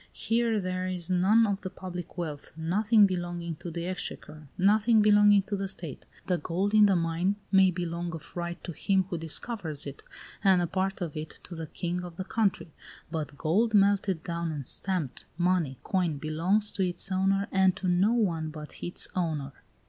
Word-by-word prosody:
Here 230 -1 +1
there 185 -1 -2
is 180 -1 -2
none 200 +6 +5
of 200 -2 -1
the 185 - -4
public 180 -2 -8
wealth, 155 -4 -5
nothing 205 +6 +4
belonging 175 -3 -3
to 175 - -7
the 170 +1 -4
exchequer, 155 -4 -6
nothing 215 +3 +4
belonging 205 -1 +6
to 205 +1 -3
the 195 0 -2
state. 165 -7 -5 0.2
The 180 -2 0
gold 185 +7 -1
in 210 -1 +7
the 195 - +3
mine 170 +3 +1 0.2
may 190 -1 +6
belong 175 -1 -3
of 160 - -11
right 175 0 -3
to 175 - -5
him 190 +4 +1
who 170 - -2
discovers 165 -2 -3
it, 140 -1 -8 0.4
and 190 -3 +5
a 175 - +1
part 190 +2 -2
of 165 -4 -3
it 155 +1 -6
to 180 - -9
the 160 -1 -5
king 175 +3 -3
of 175 -2 -8
the 185 - -3
country; 200 -8 0 0.4
but 150 -3 -4
gold 210 - +2
melted 200 -4 +3
down 170 -1 -2
and 145 -4 -5
stamped 180 -6 -3
money, 175 -6 +1
coin 175 -6 0
belongs 170 +8 0
to 195 - -1
its 180 +1 -2
owner 195 +1 +2
and 190 -1 +4
to 190 - -3
no 180 +4 +3
one 170 -9 0
but 150 -1 -9
its 175 - -2
owner. 155 -6 -1
180 Hz, 185 wpm, -28 LUFS, 165-195 Hz, 0.4 s, in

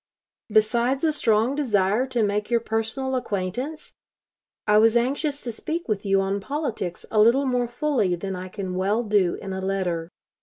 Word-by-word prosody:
Besides 235 +5 +2
a 320 - +3
strong 225 -2 +2
desire 225 -4 +1
to 245 -3 0
make 210 0 -1
your 235 -1 +3
personal 225 +4 -2
acquaintance, 245 - -3 0.7
I 210 0 +5
was 225 +2 +5
anxious 280 +4 0
to 240 - -4
speak 325 +9 -4
with 205 -2 -2
you 195 0 +3
on 195 +1 -1
politics 225 - -4
a 215 - +2
little 245 +6 +4
more 250 -2 +1
fully 240 - 0
than 190 +2 -5
I 185 +1 -6
can 190 -1 -5
well 200 +5 0
do 205 -5 +2
in 195 -1 -6
a 190 - -4
letter. 180 -4 -2
220 Hz, 175 wpm, -24 LUFS, 195-255 Hz, 0.7 s, I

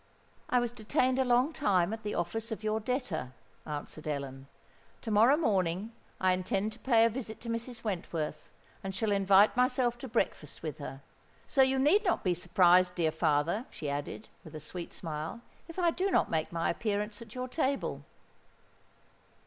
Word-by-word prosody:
"I 250 - +3
was 240 -1 -1
detained 255 +3 +1
a - - +4
long 250 +5 +3
time 195 - +2
at 225 - -5
the 210 -1 -3
office 225 +7 -2
of 220 -1 -5
your 215 0 0
debtor," 210 - -3 0.3
answered 150 +1 -6
Ellen. 140 -2 -4 0.6
"To 225 - -3
morrow 230 +7 +6
morning 195 - 0 0.3
I 185 -1 +3
intend 195 +3 -1
to 220 - -12
pay 230 -3 +4
a - - +4
visit 225 -2 -5
to 230 - -6
Mrs. 230 +1 -4
Wentworth, 165 -7 -3 0.3
and 190 -1 -4
shall 210 +2 0
invite 200 +1 +5
myself 250 -1 +2
to 265 - -6
breakfast 215 - -2
with 155 -1 -4
her. 140 -1 -7 0.4
So 275 - +3
you 265 0 +4
need 305 +11 +4
not 360 - +1
be 180 - +2
surprised, 180 +1 +4
dear 165 -3 +1
father," 160 - +1
she 145 -2 -5
added, 145 +9 -5 0.2
with 160 -3 -11
a - - -5
sweet 170 +3 -6
smile, 160 +6 -5 0.3
"if 330 - -10
I 345 -2 +3
do 375 +4 0
not - - +2
make 160 -1 0
my 165 -1 0
appearance 210 +2 -2
at 230 0 -11
your 255 0 -3
table." 275 0 -1
210 Hz, 180 wpm, -31 LUFS, 170-245 Hz, 0.6 s, morrow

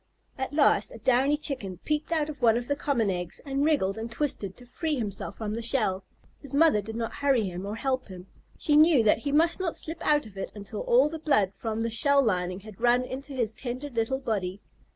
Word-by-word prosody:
At 265 0 -4
last 300 +9 +4
a - - -9
downy 265 +4 +2
Chicken 210 -11 -3
peeped 305 +1 -1
out 310 -3 +1
of 295 -3 -8
one 230 -1 +5
of 240 - -3
the 285 - 0
common 240 -8 0
eggs, 180 -2 -4
and 275 0 -1
wriggled 250 -10 +1
and 230 +1 -5
twisted 230 -8 -2
to 245 - -12
free 305 +5 -2
himself 210 -6 -4
from 215 -2 -4
the 230 - -3
shell. 215 -6 0 0.4
His 280 -1 -6
mother 305 -8 +5
did 220 +2 -7
not 230 -1 -3
hurry 275 -5 +2
him 185 0 -5
or 210 - -4
help 260 +2 -2
him. 185 -2 -10 0.3
She 295 - +2
knew 305 -5 +6
that 215 0 +4
he 280 +5 -3
must 330 +4 +4
not 360 -3 -2
slip 325 +1 -4
out 295 -3 +2
of 205 -3 -13
it - - -5
until 205 0 -6
all 255 +4 +4
the 320 +1 -6
blood 275 - +2
from 225 0 -3
the 230 - -2
shell 280 +4 +4
lining 185 -4 -1
had 215 +1 -13
run 245 +1 +4
into 270 +3 -7
his 235 -4 -1
tender 255 +4 -6
little 235 +3 -1
body. 200 -7 -3
245 Hz, 230 wpm, -27 LUFS, 210-285 Hz, 0.4 s, knew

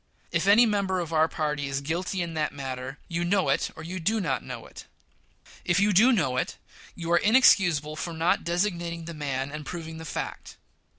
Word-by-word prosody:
If 170 +2 0
any 215 +4 +7
member 200 -4 0
of 165 -2 -4
our 160 0 +4
party 150 -3 -2
is 135 0 -2
guilty 175 +5 -2
in 170 -1 -5
that 155 -1 -1
matter 130 0 -6
you 170 0 -2
know 190 +2 +1
it - - +1
or 155 - -9
you 180 +3 -5
do 215 +7 +1
not 135 -10 -1
know 125 -3 -7
it. - - -12 0.8
If 175 +1 +2
you 205 +1 +3
do 225 +8 +6
know 150 - +1
it, - - -2 0.4
you 170 -1 -4
are 175 - +5
inexcusable 175 - +4
for 170 - -4
not 165 +2 +1
designating 170 -2 -2
the 170 - -6
man 140 -3 -3
and 150 0 -6
proving 160 +1 -7
the - - -7
fact. - - -6
170 Hz, 200 wpm, -27 LUFS, 150-185 Hz, 0.8 s, any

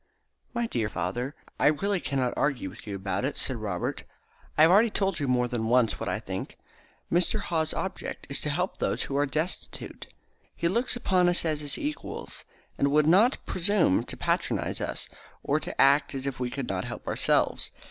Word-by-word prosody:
"My 235 0 +1
dear 115 - -1
father, 125 +5 -3 0.2
I - - +5
really 195 +6 +2
cannot 135 -6 -1
argue 125 -10 0
with 95 - -12
you 100 - -3
about 95 +1 -2
it," 140 +2 -1
said 130 - 0
Robert. 100 -5 -3 0.6
"I 155 - +7
have 165 - +7
already 215 +5 +6
told 195 -4 0
you 145 - -1
more 125 -1 +2
than 120 -2 -2
once 120 -1 +3
what - - -2
I - - 0
think. - - -6 0.6
Mr. 180 +5 +2
Haw's 160 -5 -1
object 190 - -4
is 140 - +1
to 150 - -2
help 180 +6 -1
those - - 0
who 135 - -4
are 145 +1 +2
destitute. 155 +6 -4 0.5
He 170 - 0
looks 235 +8 +1
upon 185 -6 +3
us 175 -1 +1
as 155 -2 0
his 145 -1 -1
equals, 295 +1 -5 0.3
and 140 - +4
would 150 +1 +4
not 200 - +4
presume 185 - +2
to - - -4
patronise - - -1
us, - - -3 0.4
or - - +1
to - - -7
act 140 +1 +5
as 135 0 -3
if 135 -3 -3
we 125 -1 -1
could 130 0 -4
not 95 -1 -2
help - - -7
ourselves. - - +1
145 Hz, 195 wpm, -28 LUFS, 125-180 Hz, 0.6 s, I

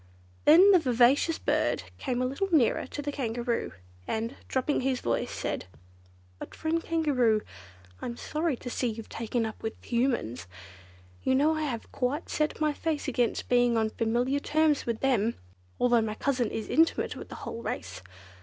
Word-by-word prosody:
Then 355 +7 +8
the 370 - +7
vivacious 260 +4 +3
bird - - 0 0.2
came 255 -2 -1
a - - +1
little 275 +10 -2
nearer 285 -9 +3
to 290 - -6
the 290 - -2
Kangaroo, 240 -3 -2 0.4
and, 225 +4 -2
dropping 260 +2 0
his 260 -1 0
voice, 115 - -1
said: - - -3 0.7
"But, - - -8
friend 330 +1 -1
Kangaroo, 260 -10 +2 0.6
I'm 235 0 -5
sorry 310 -1 -1
to 245 - -7
see 250 - -1
you've 225 -1 -5
taken 230 0 -2
up 220 - -6
with 220 - -4
Humans. 235 - -1 0.7
You 260 - +2
know 300 +4 +4
I 310 - -2
have 235 -6 -5
quite 270 +5 -2
set 305 0 0
my 305 -1 +2
face 310 -1 -2
against 245 -3 0
being 245 -1 +3
on 220 -1 +1
familiar 245 +5 0
terms 305 -1 +1
with 230 -1 -2
them, 235 -4 +2 0.4
although 240 -2 +4
my 215 -1 -2
cousin 250 -3 0
is 220 - -4
intimate 325 +1 +2
with - - -9
the - - -8
whole 230 - -5
race. 95 - -5
250 Hz, 170 wpm, -28 LUFS, 230-295 Hz, 0.7 s, Then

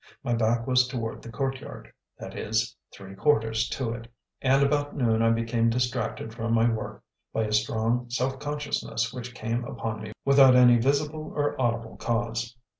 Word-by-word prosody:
My 120 - 0
back 115 0 +1
was 125 -1 +3
toward 115 -3 -4
the 115 - -10
courtyard, 135 +3 -5 0.2
that - - -8
is, 110 0 -1 0.2
"three 95 -1 -11
quarters" 110 -1 +1
to 130 -6 -2
it, 115 0 -7 0.3
and 135 +1 +4
about 145 +1 0
noon 115 -4 +2
I 115 - +4
became 115 0 +1
distracted 120 -2 -2
from 115 0 -1
my 115 +1 +4
work 110 -2 -3 0.3
by 110 - 0
a 105 - -3
strong 115 +3 +1
self 130 +2 -1
consciousness 145 -5 -2
which 125 0 -7
came 115 +2 -2
upon 110 -2 -4
me 110 0 -7
without 135 -2 +7
any 125 -1 +7
visible 150 +4 0
or 145 0 0
audible 115 -2 -1
cause. 115 0 -2
120 Hz, 170 wpm, -27 LUFS, 115-130 Hz, 0.3 s, without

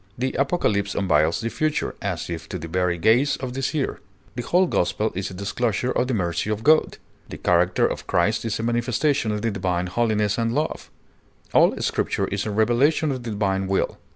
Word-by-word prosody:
The 130 +2 -1
Apocalypse 105 - 0
unveils 80 -2 +2
the 115 - -2
future, 155 +4 -1
as - - -3
if 85 -1 -6
to 95 - -4
the 85 -1 -7
very 90 +1 0
gaze 115 - +3
of 130 -2 -5
the 135 - -4
seer; 140 +1 -1 0.3
the 120 - -4
whole 180 +9 +3
gospel 105 - 0
is 95 +1 -3
a 95 - -9
disclosure 110 +5 -1
of 125 - 0
the 130 - 0
mercy 85 0 -1
of 110 +1 -2
God; 155 +3 +4 0.3
the - - -7
character 90 +1 +2
of - - -3
Christ 100 +6 +1
is 115 -2 -2
a - - -3
manifestation 120 +2 0
of 105 0 -3
the 115 - +1
divine 90 -2 -1
holiness 105 +1 0
and 115 +1 0
love; 155 +1 -2 0.6
all - - +4
Scripture - - 0
is 100 +2 -2
a - - -1
revelation 120 +9 +2
of 130 -2 -4
the 120 - -6
divine 95 -2 -1
will. 95 0 -1
110 Hz, 200 wpm, -23 LUFS, 95-125 Hz, 0.6 s, God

